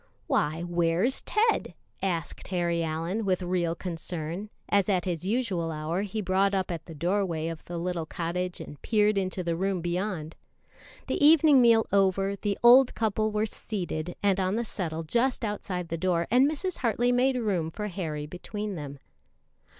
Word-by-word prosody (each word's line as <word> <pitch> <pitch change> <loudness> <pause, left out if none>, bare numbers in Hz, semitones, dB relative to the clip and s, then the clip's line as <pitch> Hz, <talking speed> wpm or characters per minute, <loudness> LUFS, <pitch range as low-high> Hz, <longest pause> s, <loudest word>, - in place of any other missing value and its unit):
"Why, 155 +3 0
where's 175 +7 +1
Ted?" 445 +1 +1 0.3
asked 175 -4 -3
Harry 170 -2 0
Allyn 165 +7 -2
with 185 -2 0
real 175 -2 0
concern, 170 +2 -5 0.2
as 200 0 +2
at 185 -3 +1
his 175 -1 -3
usual 195 -6 0
hour 155 +4 -2
he 210 +2 -3
brought 195 +2 +2
up 185 -1 -1
at 165 -2 -5
the 165 - -9
doorway 170 -1 0
of 165 -1 -7
the 175 - -5
little 170 -1 -2
cottage 180 +2 -3
and 145 - -9
peered 210 -1 +2
into 185 -1 -1
the 170 -1 -1
room 190 +1 -1
beyond. 175 -2 -3 0.7
The - - -1
evening 300 -3 +7
meal 230 -2 +5
over, 195 0 +2
the 200 0 -2
old 250 +2 +7
couple 215 -1 0
were 210 +1 +1
seated 175 -6 -4
on 190 -1 +2
the 235 +1 -1
settle 165 -6 -3
just 240 +8 0
outside 185 -4 -4
the 165 - -3
door, 170 -1 +1
and 255 +4 +5
Mrs. 345 +4 -3
Hartley 240 0 +1
made 255 +2 +3
room 190 -9 0
for 210 +6 -5
Harry 160 -6 -4
between 205 +6 -5
them. 145 -4 -6
185 Hz, 165 wpm, -28 LUFS, 170-215 Hz, 0.7 s, evening